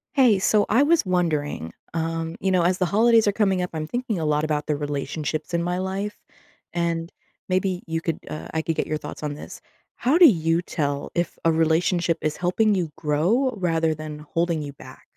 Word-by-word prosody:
Hey, 245 -8 +5
so 205 +2 +3
I 230 +6 +4
was 315 -3 +3
wondering, 155 - -1 0.2
um, 165 0 -2
you 190 - 0
know, 185 -2 +3
as 180 +1 +2
the 185 - +1
holidays 225 +3 +4
are 205 - +3
coming 195 -3 +2
up, 180 - -3
I'm 155 -1 -3
thinking 240 +2 -2
a 165 - -2
lot 150 0 +1
about 150 -1 -1
the 150 -1 -1
relationships 150 +2 -3
in 170 - +1
my 175 +1 -1
life, 195 +3 -3 0.6
and 170 -1 -1 0.4
maybe 185 0 0
you 165 0 -2
could, 165 -1 -3
uh 155 - -6
I 160 - 0
could 165 0 -2
get - - -1
your 155 - -1
thoughts 155 - -8
on 150 -1 -2
this. 145 - -9 0.4
How 265 +7 +2
do 355 - +9
you 165 - +2
tell 145 -5 -3
if 175 -2 -1
a 165 - +4
relationship 165 +2 +2
is 155 0 -1
helping 205 +4 +2
you 175 -5 -1
grow 185 - +1
rather 165 -3 +1
than 155 -1 -7
holding 165 +1 -1
you 145 -1 -5
back? - - -13
170 Hz, 205 wpm, -24 LUFS, 155-190 Hz, 0.6 s, do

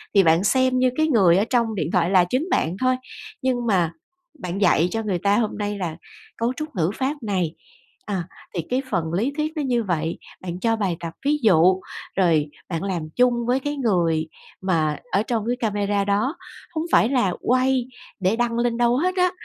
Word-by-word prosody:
thì 195 - +7
bạn 165 +2 +4
xem 255 +3 +2
như 255 0 +4
cái 315 0 +3
người 190 - +5
ở 205 - +2
trong 235 -3 +1
điện 175 -3 -2
thoại 180 -3 +2
là 185 -2 +5
chính 280 +8 0
bạn 165 +3 +1
thôi, 255 0 +3 0.5
nhưng 245 -2 0
mà 180 -6 +2 0.5
bạn 180 +2 -4
dạy 175 -4 +4
cho 225 0 -2
người 190 -5 -1
ta 200 +2 +2
hôm 225 -3 -1
nay 205 0 -2
là 170 -4 -4 0.4
cấu 235 +2 0
trúc 305 +1 -7
ngữ 170 -1 +1
pháp 275 0 -2
này, 185 -6 -1 0.5
à, 190 -4 -2 0.3
thì 170 - 0
cái 255 +2 +1
phần 165 -4 -1
lý 220 +10 0
thuyết 305 +1 -1
nó 305 - -1
như 245 -4 +1
vậy, 165 -3 -1 0.2
bạn 180 -1 -5
cho 225 +1 +1
bài 190 -6 -1
tập 165 -1 -6
ví 295 +1 +3
dụ, 185 -2 +5 0.4
rồi 165 -6 +3 0.2
bạn 165 +2 -3
làm 185 -5 -2
chung 250 0 +4
với 255 +2 +2
cái 290 +2 -3
người 170 - +1 0.3
mà 160 -5 +1
ở 200 +3 +2
trong 225 -2 -2
cái 245 - +1
camera 205 -2 0
đó. 210 - +1 0.4
Hông 315 +1 -1
phải 225 - +5
là 240 -10 +2
quay 255 0 +2 0.3
để 190 +4 +2
đăng 240 0 0
lên 235 -1 +1
đâu 240 +1 +3
hết 365 +5 0
á, 365 0 +3
205 Hz, 205 wpm, -23 LUFS, 180-250 Hz, 0.5 s, thì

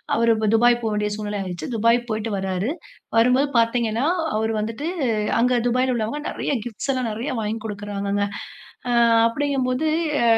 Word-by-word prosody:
அவரு 230 0 +4 0.2
துபாய் 240 +1 +4
போக 220 - 0
வேண்டிய 210 0 0
சூழ்நிலை 210 -1 -4
ஆயிடுச்சு. 180 -2 -5
துபாய் 230 +2 +4
போயிட்டு 220 0 -2
வராரு. 190 +3 -2 0.5
வரும்போது 250 +5 +4
பார்த்தீங்கன்னா 230 +1 +1 0.3
அவரு 220 +1 0
வந்துட்டு 225 +7 -4 0.5
அங்க 245 +1 +3
துபாய்ல 255 +1 +1
உள்ளவங்க 230 +6 -2
நிறைய - - -3
கிப்ட்ஸ் 235 +3 -3
எல்லாம் 255 -3 -1
நிறைய 235 +7 -4
வாங்கிக் 220 +1 -3
கொடுக்குறாங்கங்க. 205 -1 -2 0.7
ஆ, - - +1 0.3
அப்பிடிங்கம்போது 260 +2 0 0.4
அ - - +2
230 Hz, 145 wpm, -22 LUFS, 210-250 Hz, 0.7 s, அவரு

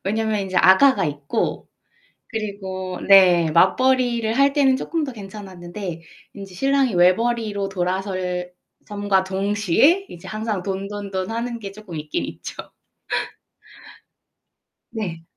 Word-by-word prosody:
왜냐면 215 +1 0
인제 190 -1 -4
아가가 195 +2 +5
있고, 145 +8 -3 0.6
그리고 190 -4 -5
네, 180 -4 +6
맞벌이를 235 +6 +2
할 275 0 +4
때는 275 -3 +3
쪼끔 315 +3 -2
더 265 - -5
괜찮았는데 190 -4 -8 0.3
인제 195 -2 -10
신랑이 270 +1 +1
외벌이로 205 +3 +2
돌아설 180 -1 -3 0.3
섬과 205 -2 0
동시에 205 - +2
이제 170 - -11
항상 215 -3 -3
돈돈돈하는 200 +4 -4
게 195 -2 -7
쪼끔 200 -5 -10
있긴 150 0 -3
있죠. - - -8 2.4
네. 180 -8 -5
200 Hz, 245 characters per minute, -22 LUFS, 185-225 Hz, 2.4 s, 네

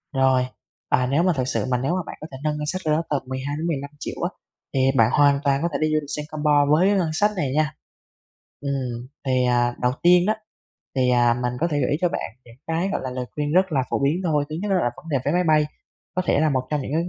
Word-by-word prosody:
Rồi, 130 -1 +3 0.4
à, 125 0 +2
nếu 150 +5 +3
mà 180 -1 +3
thực 130 - +1
sự - - -1
mà 125 - +3
nếu 135 +7 -1
mà 185 - 0
bạn - - -7
có 155 - -6
thể 130 - -7
nâng 150 -1 0
ngân 150 - -3
sách 185 +5 -2
đâu 155 -1 +3
đó 165 - 0
tầm 145 -2 0
12.000.000-15.000.000 145 +2 -4
á, - - +1 0.4
thì 135 - +1 0.2
bạn 115 -3 +5
hoàn 140 -1 +4
toàn 140 -1 +2
có 170 - +1
thể - - +1
đi 155 - +3
du 155 - +3
lịch 145 - -11
Singapore 150 -1 +1
với 170 +6 +5
cái 205 - +3
ngân 175 -4 +1
sách 210 +6 +2
này 145 -8 -1
nha. 155 0 +1 0.9
Ừm, 130 -4 -3 0.2
thì, 130 -1 +2
à, 120 0 +2
đầu 125 - +3
tiên 175 0 +6
đó, 215 - +3 0.6
thì, 130 -1 +3
à, 120 -1 +4
mình 125 0 -2
có 170 - +2
thể 145 - 0
gợi 125 - +1
ý 145 - +2
cho 180 - +3
bạn - - -4
những 115 0 -16
cái, 165 +3 0
gọi - - -1
là, 130 - -3
lời 125 0 -3
khuyên 150 0 -2
rất 185 +1 +3
là 135 -3 +2
phổ - - +1
biến 155 +6 +1
thôi. 150 -4 +1
Thứ 155 - -3
nhất 210 - -2
đó - - +3
là 120 -9 +1
vấn 165 - -13
đề 140 - +2
vé 145 - +1
máy 180 +1 +2
bay, 155 -1 +4 0.5
có 185 - 0
thể - - +3
là 155 0 +3
một 130 -2 -1
trong 150 -1 0
những 135 - -5
cái 165 - +2
145 Hz, 275 wpm, -23 LUFS, 130-160 Hz, 0.9 s, tiên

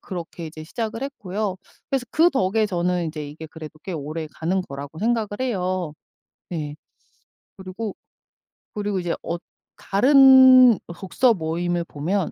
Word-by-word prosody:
그렇게 170 -2 -7
이제 155 0 -9
시작을 225 +7 -4
했고요. 210 -7 -3 0.3
그래서 270 -2 0
그 335 +3 +4
덕에 215 -1 +1
저는 180 -2 -1
이제 155 -2 -5
이게 155 +2 -9
그래도 155 -1 -11
꽤 190 - -6
오래가는 160 +4 -3
거라고 140 0 -8
생각을 225 +1 0
해요. 185 -9 -1 0.6
네. 150 -4 -4 0.8
그리고, 190 +2 -6 0.8
그리고 205 -2 -2
이제 175 -1 -2
어 170 - -3 0.4
다른 260 +1 +7
독서모임을 175 -3 0
보면 170 +6 -2
185 Hz, 285 characters per minute, -23 LUFS, 160-220 Hz, 0.8 s, 다른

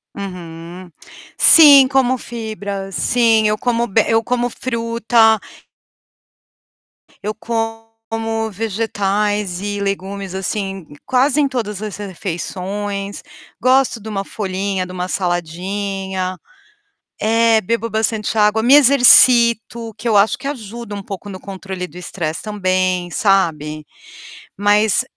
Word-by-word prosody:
Uhum. 175 -2 -9 0.5
Sim, 285 -5 +8
como 260 -2 +1
fibra, 205 -4 -6
sim. 225 +1 +2
Eu 210 - 0
como 235 +1 0
be 215 +1 +2
eu 225 0 +2
como 245 +1 -1
fruta 230 -2 +1 1.8
eu 210 +1 -3
como 225 0 -4
vegetais 205 -2 -2
e 205 0 -3
legumes 195 -1 -4
assim 195 -1 -4 0.2
quase 265 +3 +2
em 280 - +2
todas 215 -6 -4
as 210 -3 -6
refeições. 200 +1 -5 0.4
Gosto 255 -1 +2
de 220 - -8
uma 195 -2 -3
folhinha, 195 -2 -3
de 180 - -10
uma 180 0 -4
saladinha. 185 +2 -3 0.8
É, 225 0 +3
bebo 230 +4 -2
bastante 220 0 -1
água, 210 +1 +3
me 255 +5 +6
exercito, 235 -4 +5
que 225 - -5
eu 220 - +2
acho 210 +5 +3
que 265 +2 -7
ajuda 235 -4 -7
um 200 - -5
pouco 195 +1 -8
no 190 - -8
controle 190 -1 -7
do 175 +3 -14
estresse 170 -3 -5
também, 185 -3 -1
sabe. 160 -6 0 0.7
Mas, 205 +1 +2
210 Hz, 115 wpm, -18 LUFS, 190-230 Hz, 1.8 s, Sim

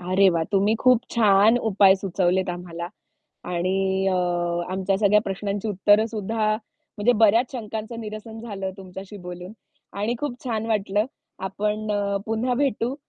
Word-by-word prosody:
अरे, 185 +2 +3
वा! 165 -2 0
तुम्ही 200 +2 +3
खूप 255 -2 +5
छान 215 0 +5
उपाय 195 -1 +6
सुचवलेत 185 -1 0
आम्हाला. 175 -1 -6 0.6
आणि 190 +2 0
अ, 185 - +1 0.6
आमच्या 190 +1 0
सगळ्या 210 0 +4
प्रश्नांची 200 +1 -3
उत्तरं 205 +2 +3
सुद्धा, 215 0 -1 0.5
म्हणजे 235 +4 +4
बऱ्याच 225 +5 +4
शंकांचं 225 -1 -5
निरसन 220 +1 -7
झालं 195 -4 -5
तुमच्याशी 190 +2 -9
बोलून 180 +2 -8 0.5
आणि 215 +4 0
खूप 265 -4 -4
छान 225 -3 -2
वाटलं. 210 -1 +1 0.3
आपण 210 +3 -2
अ, 200 -1 0
पुन्हा 230 +3 0
भेटू 255 -2 0
205 Hz, 140 wpm, -24 LUFS, 190-220 Hz, 0.6 s, उपाय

